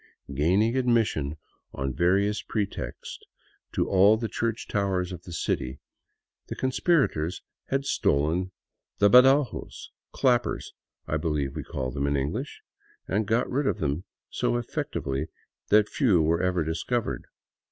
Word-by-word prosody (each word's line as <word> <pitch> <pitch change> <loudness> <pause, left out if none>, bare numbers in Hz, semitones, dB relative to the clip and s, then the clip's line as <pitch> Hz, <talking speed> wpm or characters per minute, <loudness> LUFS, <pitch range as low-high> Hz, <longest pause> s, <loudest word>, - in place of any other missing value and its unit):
Gaining 95 - +2
admission 115 - +1 0.4
on 65 -1 -3
various 100 +7 +2
pretexts 105 -3 -4 0.5
to - - 0
all 100 +3 +5
the 115 0 -2
church 115 0 -2
towers 95 -3 -1
of 90 -2 -7
the 85 - -9
city, 70 -4 -2 0.7
the - - -5
conspira 140 +4 +2
tors 80 +4 -4 0.2
had 135 0 -1
stolen 85 - +1 0.5
the 100 0 +4
badajos 135 +3 +4
— - - -67
clappers, 125 -2 +1 0.3
I 75 - 0
believe 75 -4 -2
we - - -3
call 65 -2 -4
them 70 +1 -1
in 70 0 +1
English 70 +2 -3 0.2
— - - -34
and 105 +1 0
got 115 +3 +2
rid 135 +2 0
of - - +1
them 80 0 -2 0.3
so - - 0
effectually 70 +4 -3 0.4
that 105 0 +5
few 110 - +2
were 80 +2 +2
ever 90 -2 +1
dis 80 +2 -3
covered. 120 -2 -2
95 Hz, 145 wpm, -27 LUFS, 75-115 Hz, 0.7 s, all